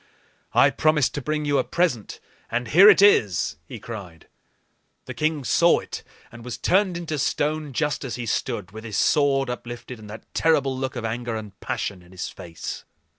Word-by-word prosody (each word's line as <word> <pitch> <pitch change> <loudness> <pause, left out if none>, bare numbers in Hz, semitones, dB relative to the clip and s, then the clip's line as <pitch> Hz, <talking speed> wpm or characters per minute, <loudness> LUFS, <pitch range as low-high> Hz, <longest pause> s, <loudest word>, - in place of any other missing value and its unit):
"I - - +6
promised 155 -4 +2
to 145 - -3
bring 150 +2 -2
you 145 -1 +2
a - - +2
present, 165 - -1 0.3
and 120 0 -2
here 190 - +8
it 200 - +6
is!" 100 - +4
he - - -7
cried. 100 -7 -9 0.8
The 130 - -6
king 155 +2 -1
saw 170 +8 +4
it, - - -6 0.3
and 120 -1 -11
was 125 -1 -5
turned 190 -2 +2
into 155 -3 -4
stone, 150 +2 -1
just 145 0 -1
as 130 - -4
he 120 - -5
stood, 110 -4 -2
with 110 +2 -9
his 110 -3 -4
sword 140 -3 +3
uplifted 120 0 -7
and 105 -1 -12
that 110 - -9
terrible 140 -5 +2
look 130 0 -3
of 120 -2 -4
anger 115 +1 -3
and 110 -2 -6
passion 95 -3 -3
in 90 +1 -18
his 90 - -5
face. 85 -2 -7
125 Hz, 185 wpm, -24 LUFS, 110-150 Hz, 0.8 s, here